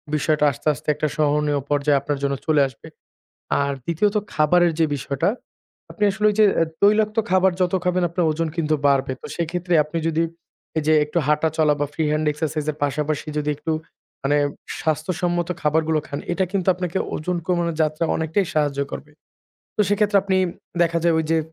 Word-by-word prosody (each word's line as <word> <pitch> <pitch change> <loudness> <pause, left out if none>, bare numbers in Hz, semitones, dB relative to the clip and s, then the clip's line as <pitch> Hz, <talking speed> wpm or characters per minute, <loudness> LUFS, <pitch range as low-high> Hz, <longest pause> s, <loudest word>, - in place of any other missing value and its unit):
বিষয়টা 150 0 +2
আস্তে, 140 - -8
আস্তে 135 - -13
একটা 150 +1 -1
সহণীয় 150 -1 +1
পর্যায়ে 145 -1 +2
আপনার 145 +1 -2
জন্য 140 0 +1
চলে 150 -2 +4
আসবে। 130 -4 -14 0.7
আর 140 0 0
দ্বিতীয়ত 200 +6 +1 0.2
খাবারের 170 +3 +4
যে 165 - +4
বিষয়টা, 140 +3 -1 0.6
আপনি 210 - -3
আসলে 215 +2 -2
ওই 210 - -1
যে 215 - +7 0.2
আ - - +6 0.2
তৈলাক্ত 215 +1 +3
খাবার 185 +1 +4
যত 180 0 +1
খাবেন, 180 0 +1
আপনার 170 0 0
ওজন 165 +1 -1
কিন্তু 155 -2 +1
বাড়বে। 135 -1 +2
তো - - -9
সেক্ষেত্রে 175 +1 -2
আপনি 155 +2 -5
যদি 165 +1 +1 0.5
এই 155 - +1
যে 155 - +5
একটু 150 +3 -4
হাঁটা 150 +1 +2
চলা 150 -2 +4
বা 145 - +1
ফ্রি 160 - -1
হ্যান্ড 155 +1 0
এক্সারসাইজ 155 0 -3
এর 145 - -15
পাশাপাশি 150 +1 -1
যদি 150 0 -1
একটু 150 +2 -3 0.5
মানে 145 +2 +2 0.4
স্বাস্থ্যসম্মত 175 +2 -1
খাবারগুলো 155 +1 +2
খান। 140 - -4
এটা 190 +2 +1
কিন্তু 195 -3 -1
আপনাকে 180 0 -3 0.2
ওজন 175 +3 -2
কমানোর 170 -2 0
যাত্রা 155 +2 -1
অনেকটাই 160 +5 0
সাহায্য 145 -2 0
করবে। 150 - -7 0.7
তো - - +1
সেক্ষেত্রে 205 0 +2
আপনি 190 -1 0 0.5
দেখা 170 0 +1
যায় 170 -1 +4
ওই 160 - 0
যে 165 - +3
160 Hz, 180 wpm, -22 LUFS, 150-175 Hz, 0.7 s, যে